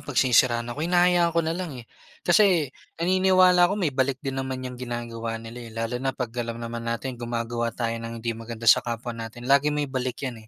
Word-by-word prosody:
'pag 145 -2 -8
sinisiraan 120 -2 +3
ako, 145 - -7
hinahayaan 175 0 +3
ko 170 - +3
na 160 - 0
lang, 170 -5 -5
eh. 120 - -9 0.4
Kasi, 175 -3 +5 0.3
naniniwala 185 0 +5
ako 200 - -1
may 170 -8 0
balik 130 0 +1
din 135 -1 -4
naman 130 -1 -3
yang 125 - -6
ginagawa 115 -2 -4
nila, 115 +1 -9
eh, 115 - -10
lalo 115 +1 -2
na 135 0 0
'pag 120 -3 -3
alam 115 -1 -4
naman 115 0 -5
nating 120 +1 -4
gumagawa 120 0 -2
tayo 115 0 -2
ng 115 0 -6
hindi 115 +1 -2
maganda 115 0 -8
sa 115 - +7
kapwa 120 0 -4
natin, 115 +1 -8
lagi 140 +2 +4
may 150 0 0
balik 130 -1 -3
'yan, 120 -4 -5
125 Hz, 210 wpm, -25 LUFS, 115-150 Hz, 0.4 s, sa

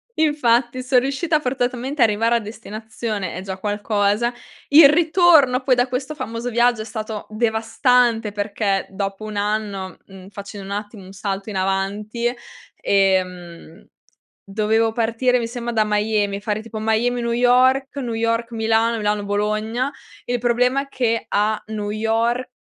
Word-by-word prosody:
Infatti 255 -5 +2
son 255 0 +4
riuscita 280 +5 0
forzatamente 255 +1 -2
a - - +8
arrivare 225 +2 +1
a - - +3
destinazione, 215 -2 -6
è 185 - -5
già 190 0 -6
qualcosa; 205 +3 0 0.4
il 285 0 +9
ritorno 315 -5 +4
poi 255 -1 +3
da 245 +1 +2
questo 265 +4 -4
famoso 235 -3 -4
viaggio 240 -1 +2
è - - -6
stato 215 -2 -6
devastante 225 +1 +1
perché 200 -1 -1
dopo 195 +1 -4
un 215 -1 -6
anno, 205 -2 -2
mhmm, 190 -1 -13
facendo 200 0 -9
un 200 - -4
attimo 210 -1 -12
un 185 - -12
salto 195 0 -4
in 200 - -4
avanti, 205 +5 -1 0.4
ehm, 180 -4 -1 0.6
dovevo 220 +3 +1
partire 235 +2 +1
mi 230 - -2
sembra 240 0 -5
da 220 -1 +3
Miami, 210 -1 0
fare 210 0 -2
tipo 225 -1 -7
Miami 225 +3 0
New 235 0 -1
York, 255 +3 +3
New 245 -4 -3
York 230 +1 -1
Milano, 225 0 +1
Milano 210 -1 -1
Bologna. 215 +5 -1 0.3
Il 245 0 -1
problema 250 +3 +2
è 280 - -15
che 230 -4 -1
a 210 +1 0
New 210 -1 -4
York, 225 +3 0
225 Hz, 150 wpm, -21 LUFS, 205-245 Hz, 0.6 s, il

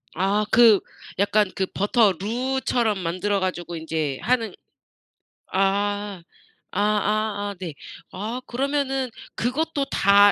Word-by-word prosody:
아 200 +4 +1
그 225 -3 +7 0.4
약간 205 -1 +3
그 190 - 0
버터 205 0 +3
루처럼 240 -1 0
만들어 185 +4 -1
가지고 175 -2 -3
인제 160 -4 -2
하는 235 -2 +1 1.0
아 200 0 0 0.5
아아아 205 0 0
네. 170 -5 -5 0.4
아 225 +7 -4
그러면은 270 0 -1 0.3
그것도 285 +4 -1
다 200 +1 +6
205 Hz, 200 characters per minute, -24 LUFS, 195-240 Hz, 1.0 s, 그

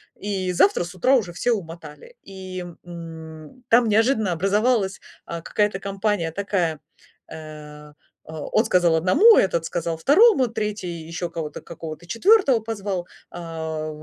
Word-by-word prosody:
и 190 -3 -3
завтра 390 - +3
с 175 +2 -10
утра 255 +9 +2
уже 200 -9 -1
все 240 +8 0
умотали. 170 - -8
И, 185 -2 -8 0.2
м, 165 +4 -10
там 235 0 +5
неожиданно 220 -1 +2
образовалась, 200 +3 +1 0.2
а, 170 0 -6
какая-то 205 +2 -1
компания 195 -3 -2
такая, 180 -4 -1 0.5
э, 150 -1 -10 0.4
а, 160 -1 -7
он 220 - +2
сказал 175 -5 +3
1, 275 - +6
этот 170 -4 +2
сказал 170 -1 -3
2, 290 - +5
3, 210 -4 -3 0.2
ещё 175 +1 -4
кого-то, 160 -3 -6
какого-то 160 0 -9
4 285 - +4
позвал, 200 -5 -4 0.2
а 160 -2 -5
185 Hz, 135 wpm, -23 LUFS, 165-215 Hz, 0.5 s, 1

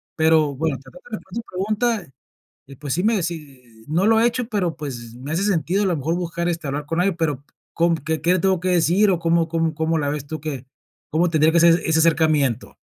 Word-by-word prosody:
Pero, 160 -2 +3
bueno, 155 -1 -1
para 135 - -15
tratar 255 -3 -16
de 215 - -3
responder 225 +5 -7
tu - - -22
pregunta, 210 - -1 0.7
pues, 145 -3 -3
sí 180 - -1
me 220 -2 +2
sí, 135 -9 -8
no 170 +6 +1
lo 225 0 +4
he 230 - +4
hecho, 240 0 0
pero, 195 -8 -1
pues, 120 -6 -7
me 135 +5 -7
hace 175 +5 0
sentido 190 0 +1
a - - +1
lo 180 -4 0
mejor 155 +4 -1
buscar, 170 -1 -3
este, 165 -3 -3
hablar 145 +2 -3
con 165 +3 -2
alguien, 180 -2 0
pero 145 -4 -1 0.3
¿con 170 0 +2
qué 160 +2 -3
qué 180 +3 +2
tengo 190 0 +2
que 185 +2 -2
decir 180 +4 +3
o 175 - 0
cómo 165 0 +2
cómo 165 -1 -1
cómo 160 +1 0
la 145 - -1
ves 145 -1 -4
tú 155 +1 -5
que 140 -4 -5 0.4
cómo 170 +3 +1
tendría 160 -1 +3
que 170 - +5
ser 170 0 +5
ese 160 0 +2
acercamiento? 155 -6 +2
165 Hz, 235 wpm, -22 LUFS, 150-180 Hz, 0.7 s, que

